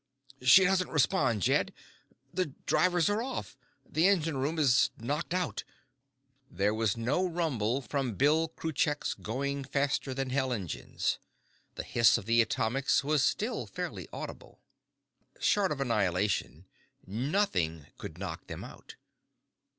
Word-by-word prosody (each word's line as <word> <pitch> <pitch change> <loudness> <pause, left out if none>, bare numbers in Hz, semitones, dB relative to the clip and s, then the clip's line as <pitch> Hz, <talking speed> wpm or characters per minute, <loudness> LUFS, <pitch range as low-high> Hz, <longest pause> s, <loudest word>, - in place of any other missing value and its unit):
"She 130 +9 +8
doesn't 185 0 +2
respond, 130 - +2
Jed. - - +2 0.6
The 185 -1 0 0.2
drivers 175 -2 +3
are 205 +2 +1
off. 260 - -5 0.3
The 160 +5 +3
engine 165 -6 +2
room 140 +5 -1
is 135 -5 +4
knocked 145 +6 -3
out." 180 -1 -1 0.9
There 100 +4 0
was 110 -1 0
no 125 +10 0
rumble 140 - 0
from 125 -1 -2
Bill 155 +6 +3
Kruchek's 155 -2 -1
going 140 +5 -3
faster 140 0 -1
than 135 -1 -2
hell 130 -1 0
engines. 100 -9 -2 0.6
The - - -4
hiss 115 -1 +4
of - - -7
the 115 +1 +4
atomics 120 +5 +1
was 145 -1 +2
still 225 +4 -1
faintly - - -5
audible. - - -8 0.8
Short 200 -4 +2
of 145 - -2
annihilation, 100 - 0 0.4
nothing 100 - -1
could - - -8
knock - - -6
them - - -7
out. - - -12
135 Hz, 130 wpm, -30 LUFS, 115-165 Hz, 0.9 s, She